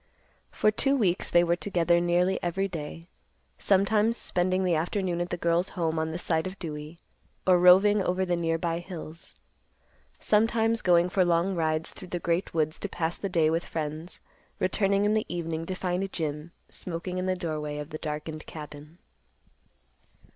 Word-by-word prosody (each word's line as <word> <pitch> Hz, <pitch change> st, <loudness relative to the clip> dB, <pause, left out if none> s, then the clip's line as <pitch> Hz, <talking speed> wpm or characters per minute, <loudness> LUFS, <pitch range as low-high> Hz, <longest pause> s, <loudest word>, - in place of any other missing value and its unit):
For 215 Hz, -, +2 dB
two 275 Hz, +6 st, +1 dB
weeks 190 Hz, -8 st, +1 dB
they 175 Hz, 0 st, +5 dB
were 170 Hz, 0 st, +2 dB
together 175 Hz, -2 st, +1 dB
nearly 175 Hz, +2 st, +1 dB
every 190 Hz, +3 st, -1 dB
day, 165 Hz, -1 st, -7 dB, 0.5 s
sometimes 210 Hz, +4 st, +2 dB
spending 185 Hz, +1 st, 0 dB
the 180 Hz, -2 st, +2 dB
afternoon 175 Hz, +2 st, -1 dB
at 175 Hz, -, -2 dB
the 175 Hz, -, -2 dB
girl's 170 Hz, +2 st, +1 dB
home 165 Hz, -2 st, 0 dB
on 160 Hz, 0 st, -1 dB
the 160 Hz, -, -4 dB
side 160 Hz, -1 st, -1 dB
of 185 Hz, +1 st, -8 dB
Dewey, 155 Hz, -1 st, -7 dB, 0.5 s
or 180 Hz, -1 st, +5 dB
roving 195 Hz, +4 st, +6 dB
over 185 Hz, 0 st, 0 dB
the 175 Hz, -1 st, 0 dB
nearby 165 Hz, 0 st, -1 dB
hills; 170 Hz, 0 st, -9 dB, 0.8 s
sometimes 225 Hz, +1 st, +2 dB
going 175 Hz, -1 st, +4 dB
for 185 Hz, 0 st, +2 dB
long 175 Hz, +2 st, +2 dB
rides 160 Hz, -2 st, -1 dB
through 185 Hz, -, -11 dB
the 175 Hz, -, -3 dB
great 170 Hz, +2 st, -1 dB
woods 155 Hz, -1 st, -1 dB
to 205 Hz, -, -4 dB
pass 165 Hz, -1 st, -2 dB
the 195 Hz, -, -3 dB
day 165 Hz, -3 st, +2 dB
with 165 Hz, +1 st, 0 dB
friends, 155 Hz, +2 st, -5 dB, 0.4 s
returning 195 Hz, +2 st, +1 dB
in 210 Hz, -, +3 dB
the 215 Hz, 0 st, 0 dB
evening 165 Hz, -1 st, -3 dB
to 185 Hz, -, -3 dB
find 185 Hz, +1 st, -2 dB
Jim 150 Hz, 0 st, -4 dB, 0.2 s
smoking 180 Hz, +1 st, -5 dB
in 185 Hz, -, -2 dB
the 185 Hz, -, +1 dB
doorway 155 Hz, -4 st, -4 dB
of 150 Hz, +2 st, -6 dB
the 155 Hz, -, -5 dB
darkened 155 Hz, 0 st, -5 dB
cabin. 150 Hz, +1 st, -10 dB
175 Hz, 170 wpm, -27 LUFS, 160-185 Hz, 0.8 s, roving